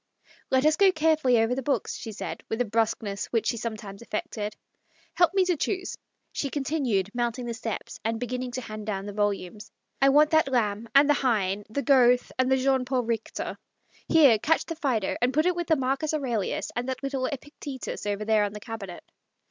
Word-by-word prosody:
" - - -28
Let 260 +2 +3
us 310 0 +4
go 390 0 +6
carefully 310 -6 +3
over 225 +2 +2
the 265 - -2
books," 275 +2 -1
she 225 - -6
said, 210 - -6
with 225 - -2
a 245 - +2
brusqueness 215 -2 -1
which 230 -2 0
she 235 - 0
sometimes 215 -3 -6
affected. 210 -1 -4 0.3
" - - -35
Help 350 +2 +4
me 380 -1 +4
to 360 -1 +2
choose," 370 +5 -2 0.4
she 280 - -2
continued, 265 -9 -1
mounting 240 0 -2
the 235 - -3
steps 225 -2 -5
and 225 +1 -1
beginning 250 +1 -3
to 255 - -3
hand 215 -2 -7
down 195 -2 -2
the 205 - -6
volumes. 205 0 -2
" - - -45
I 275 - +6
want 300 +2 +5
that 315 -2 +4
Lamb 225 -4 0
and 280 +1 +7
the 295 - +5
Heine, 210 -7 0
the 280 +6 -2
Goethe 250 -3 +4
and 255 0 +2
the 265 - +5
Jean 265 0 +2
Paul 255 0 0
Kichter. 225 -1 -3 0.5
Here, 280 -9 +6
catch 320 +8 +1
the 330 - -5
Phsedo, 255 - -1
and 250 +2 +1
put 310 +2 +3
it 360 -1 +2
with 345 -1 -3
the 320 - +4
Marcus 275 +3 0
Aurelius 240 -9 -2
and 245 +2 -2
that 260 +1 -4
little 270 -2 -1
Epictetus 280 -4 -6
over 205 +1 -2
there 215 -1 +3
on 205 0 -2
the 210 - -7
cabinet." 205 -5 -7
245 Hz, 210 wpm, -27 LUFS, 215-280 Hz, 0.5 s, and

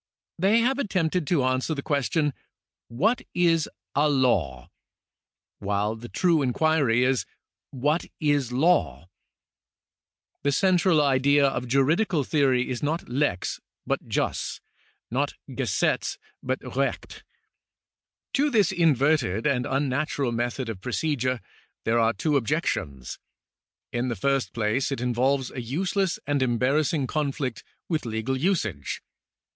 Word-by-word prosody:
They 205 +6 +4
have 265 +4 +1
attempted 180 - 0
to 160 -7 +2
answer 130 +4 0
the 140 - -5
question: 145 0 0 0.3
" - - -68 0.2
What 230 +3 +3
is 165 -3 +2 0.2
a 150 +2 +3
law? 95 - +1 0.4
" - - -67
while 105 +2 -1
the 120 +2 -10
true 170 -4 +2
inquiry 135 -2 +2
is: 130 -1 +1 0.3
" - - -66 0.2
What 150 +4 +2
is 145 -5 +1
law? 90 - +1 0.7
" - - -61
The 140 - +2
central 180 -1 +3
idea 140 +1 +4
of 125 -2 -1
juridical 150 - +2
theory 130 -4 +2
is 125 - -3
not 155 +4 -2
lex 125 -8 -1 0.3
hut - - -2
jus, - - -2 0.5
not - - -1
gesetz - - -1 0.2
but 130 -1 -4
recht. 135 +1 -2 1.1
To 285 +2 +2
this 215 - +3
inverted 140 - +2
and 125 -4 +1
unnatural 135 -1 0
method 120 +2 -2
of 110 -5 -6
procedure 130 -1 -1 0.4
there 115 +1 +2
are 115 0 +3
two 145 +8 +1
objections. 110 - -2 0.7
In 120 +1 -1
the 120 - -2
first 135 0 0
place 115 +5 0
it 135 - -2
involves 125 +2 0
a 125 - -5
useless 180 - -1
and 145 -1 0
embar 125 +1 +1
rassing 145 -2 -1
conflict 140 -5 -2 0.2
with 155 -7 -2
legal 110 +4 -2
usage. 130 - -1
135 Hz, 130 wpm, -26 LUFS, 120-155 Hz, 1.1 s, They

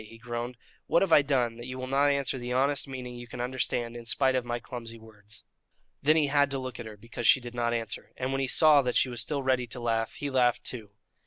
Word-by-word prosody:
he 115 +1 -13
groaned. 120 +1 -5 0.3
"What 170 - +4
have 190 - -1
I 150 - +8
done 125 -5 0
that 120 +1 -8
you 130 0 -6
will 130 - -4
not 135 +2 +2
answer 140 -2 0
the 120 0 -5
honest 140 +3 +2
meaning 130 -2 -6
you 120 0 -9
can 120 - -9
understand 120 -1 -1
in 120 -1 -8
spite 135 0 +2
of 130 -1 0
my 120 0 -2
clumsy 115 -2 -8
words?" 110 -1 -12 0.6
Then 155 +3 +4
he 155 -2 +4
had 145 0 +3
to 135 - -3
look 130 -2 -6
at 120 - -6
her 105 -1 -10
because 115 +2 -4
she - - +7
did 120 -1 -9
not 120 -1 0
answer, 115 -2 -4
and 130 +1 -2
when 135 0 0
he 135 - 0
saw 150 +1 +6
that 125 -2 -2
she 130 - +3
was 120 -2 -2
still 140 +5 -2
ready 130 -2 +1
to 125 - -6
laugh, 115 -1 -1
he 145 -1 -5
laughed, 125 -2 +2
too. 110 -5 -4
125 Hz, 260 wpm, -28 LUFS, 120-135 Hz, 0.6 s, I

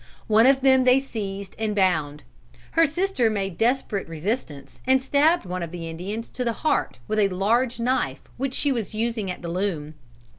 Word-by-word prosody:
One 220 +3 +5
of 270 0 +4
them 265 -1 +5
they 255 +1 +5
seized 200 -7 -6
and 215 -2 -1
bound. 155 -7 +1 0.5
Her 330 -1 +4
sister 330 - +1
made 195 -4 -2
desperate 230 -4 0
resistance, 160 - -4
and 265 0 +5
stabbed 290 - +2
one 180 0 -4
of 170 - -4
the 170 -1 -6
Indians 195 +8 -5
to 250 - -4
the 235 -1 0
heart 305 - +1
with 215 - 0
a 205 - +4
large 230 +7 +1
knife 230 - 0
which 270 +1 -3
she 290 - +1
was 225 -5 -3
using 225 -3 -1
at 180 - -6
the 170 - -4
loom. 170 -4 -2
215 Hz, 185 wpm, -24 LUFS, 180-260 Hz, 0.5 s, One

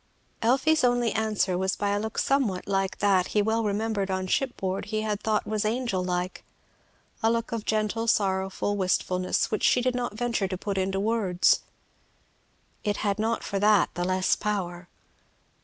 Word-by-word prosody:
Elfie's 270 +7 +3
only 245 -2 +2
answer 215 -4 0
was 190 0 0
by 205 - -1
a 205 - +1
look 220 +1 -5
somewhat 250 -10 +1
like 195 -1 0
that 195 -3 +3
he - - +6
well 225 +2 +1
remembered 205 -1 -1
on 190 0 -1
shipboard 195 -4 -1
he 215 0 -2
had 210 -1 -2
thought 215 -1 0
was 215 -1 -1
angel 220 -4 -1
like, 180 0 -3 0.8
a 225 - +3
look 230 0 -1
of 230 -2 -3
gentle 215 +1 0
sorrowful 195 -1 0
wistfulness 185 -1 0
which 215 - -1
she - - +4
did 250 0 +1
not 245 -3 -3
venture 235 -4 0
to 185 0 -4
put 195 0 -2
into 195 +1 -1
words. 200 -4 +2 1.2
It 205 -1 0
had 200 0 0
not 225 +2 0
for 200 - -2
that 205 -2 +4
the 175 - -2
less 185 +1 +2
power. 180 -4 -3
205 Hz, 170 wpm, -26 LUFS, 190-225 Hz, 1.2 s, he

